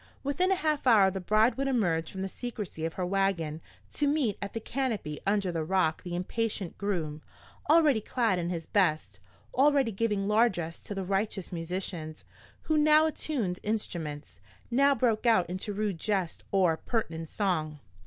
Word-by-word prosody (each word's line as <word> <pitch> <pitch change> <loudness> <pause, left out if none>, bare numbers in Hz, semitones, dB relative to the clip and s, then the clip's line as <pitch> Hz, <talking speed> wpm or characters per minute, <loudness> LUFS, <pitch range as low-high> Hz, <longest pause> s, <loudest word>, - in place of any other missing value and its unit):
Within 350 +7 +1
a - - +4
half 305 -6 -1
hour 205 -5 +6
the 190 - -4
bride 215 +7 +3
would 275 0 0
emerge 175 -11 0
from 190 0 -5
the - - -1
secrecy 210 -7 -5
of 165 - -3
her 185 - -2
wagon 180 -5 0 0.3
to 295 - +1
meet 280 -8 +1
at 200 - -5
the 225 - -2
canopy 225 - -3
under 200 -2 +1
the 165 -2 -2
Rock 165 -2 +1
the 175 -1 -5
impatient 200 0 -2
groom, 165 -7 -2 0.5
already 300 -7 +5
clad 225 -4 0
in 170 0 -2
his 170 -2 -4
best, 170 -7 +1 0.3
already 275 -3 +3
giving 205 -1 -1
largess 200 -7 +1
to 205 - -7
the 195 -1 -3
riotous 195 0 -2
musicians, 165 -2 -5 0.4
who 310 -1 +1
now 305 +1 +6
attuned 255 - -2
instruments, 170 -9 -4 0.3
now 275 +3 +4
broke 240 -3 +1
out 185 -7 +4
into 185 +4 -4
rude 205 -4 -2
jests 190 -5 -1
or 185 -5 +3
pertinent 165 -9 -3
song. 160 -7 -1
195 Hz, 165 wpm, -29 LUFS, 175-235 Hz, 0.5 s, hour